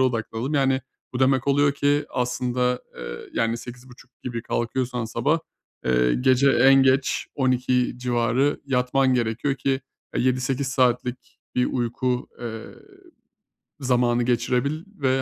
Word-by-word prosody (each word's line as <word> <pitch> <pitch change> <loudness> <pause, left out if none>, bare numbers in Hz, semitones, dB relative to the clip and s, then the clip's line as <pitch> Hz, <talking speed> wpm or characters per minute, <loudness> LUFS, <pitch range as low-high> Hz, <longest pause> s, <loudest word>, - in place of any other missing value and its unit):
odaklanalım. 125 +2 -1
Yani, 135 -1 +2 0.3
bu 125 - -4
demek 130 0 +3
oluyor 145 +1 +3
ki 145 +1 +1
aslında, 125 0 -1
eee, - - -7
yani, 115 0 0
08.30 125 +1 -12
gibi 120 -2 -4
kalkıyorsan 125 0 -2
sabah, 120 +8 0 0.5
eee, 60 -1 +2
gece 130 - +4
en 135 +2 +6
geç 130 0 +2
12.00 125 -2 +1
civarı 125 +3 +1
yatman 130 0 +2
gerekiyor 120 +3 0
ki, 135 0 -1 0.4
eee, - - +1
7-8 130 +1 0
saatlik 125 -1 -1
bir 125 - +2
uyku, 125 +1 -1
eee, 115 -2 -6 1.2
zamanı 120 -2 +2
geçirebil 125 +6 0
ve, 130 -2 +1
125 Hz, 120 wpm, -24 LUFS, 120-135 Hz, 1.2 s, en